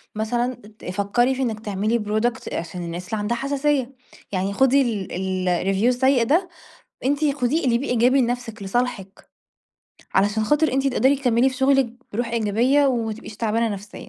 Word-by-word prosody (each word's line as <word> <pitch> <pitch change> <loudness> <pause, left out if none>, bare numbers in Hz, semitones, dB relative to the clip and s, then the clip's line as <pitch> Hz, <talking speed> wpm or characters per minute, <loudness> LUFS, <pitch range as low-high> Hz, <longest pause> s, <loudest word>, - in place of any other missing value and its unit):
مثلًا 240 +3 -1 0.3
ت - - -13
فكّري 205 +7 +1
في 265 - -3
إنِك 225 -4 -1
تعملي 215 +2 -1
product 215 +3 -2
عشان 175 +1 -4
الناس 175 +2 -6
اللي 220 - -2
عندها 230 +3 -1
حساسيّة، 275 -1 -1 0.4
يعني 195 +1 -1
خدي 265 +4 +4
ال 215 -7 -2
ال 185 -1 -1
الreview 200 +4 0
السيّء 255 0 +3
ده، 345 +9 +1 0.6
أنتِ 285 +1 +1
خُديه 280 +5 0
اقلبيه 245 +2 +1
إيجابي 245 +3 +3
لنفسِك، 235 -3 -3
لصالحِك، 195 -2 -3 0.9
علشان 205 +3 +2
خاطر 295 +5 +2
أنتِ 270 +1 +1
تقدَري 270 +1 +3
تكمّلي 250 -1 +2
في 260 - -6
شُغلِك 265 -3 +2 0.2
برُوح 235 +3 -2
إيجابية، 235 +6 +2
وما 230 -4 0
تبقيش 220 -1 -10
تعبانة 225 +1 0
نفسيًا. 205 0 -8
235 Hz, 160 wpm, -22 LUFS, 205-265 Hz, 0.9 s, خدي